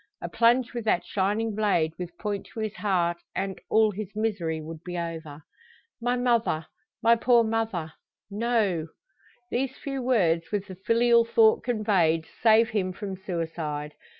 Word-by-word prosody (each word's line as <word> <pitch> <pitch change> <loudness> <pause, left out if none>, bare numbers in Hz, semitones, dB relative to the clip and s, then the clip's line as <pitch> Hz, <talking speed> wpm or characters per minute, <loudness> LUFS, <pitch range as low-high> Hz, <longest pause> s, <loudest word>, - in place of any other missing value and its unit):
A - - -5
plunge 240 +1 +3
with 240 -1 -4
that 185 -5 +1
shining 210 +3 0
blade 195 -7 +1
with 175 -1 -6
point 205 -2 -4
to - - -9
his 215 -1 -2
heart, 175 -4 +1 0.2
and 195 -1 -3
all 220 -1 +4
his 210 0 -7
misery 195 -8 -1
would 160 +1 -9
be 180 -1 -5
over! 160 -3 -6 0.6
"My 245 +1 +1
mother 235 -10 +1 0.4
my 230 +1 +6
poor 235 0 +4
mother 220 -8 -2 0.4
no!" 205 -7 0 0.6
These 265 +2 -1
few 275 -1 -4
words, 180 -10 +1
with 205 -2 -1
the 190 - -9
filial 235 +4 +3
thought 440 - +4
conveyed, 195 -9 +1 0.2
save 225 0 +5
him 190 -4 -1
from 195 +1 -5
suicide. 160 -5 -4
205 Hz, 150 wpm, -26 LUFS, 170-230 Hz, 0.6 s, my